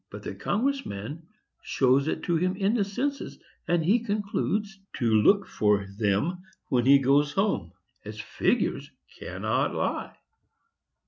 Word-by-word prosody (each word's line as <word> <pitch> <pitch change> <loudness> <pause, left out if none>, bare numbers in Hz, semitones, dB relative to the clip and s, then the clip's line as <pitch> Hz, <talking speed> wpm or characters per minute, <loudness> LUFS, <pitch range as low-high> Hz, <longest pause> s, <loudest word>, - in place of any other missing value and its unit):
But - - -9
the - - -5
Congress 270 +6 -1
man 145 +12 -7 0.3
shows 135 +2 +2
it 160 - -2
to 175 - 0
him 180 +3 +1
in 195 +2 +1
the 230 -4 +2
census, 265 +8 -3 0.3
and 170 -2 +1
he 210 +8 +4
concludes 205 -2 -2 0.2
to 120 - -2 0.2
look 200 - +4
for 105 -1 +1
them 105 - 0 0.3
when 125 -3 +2
he 140 +1 +8
goes 140 +2 +2
home, 200 +2 0 0.3
as - - -8
figures - - -1 0.3
cannot - - -1
lie." - - -2
175 Hz, 140 wpm, -27 LUFS, 135-205 Hz, 0.3 s, he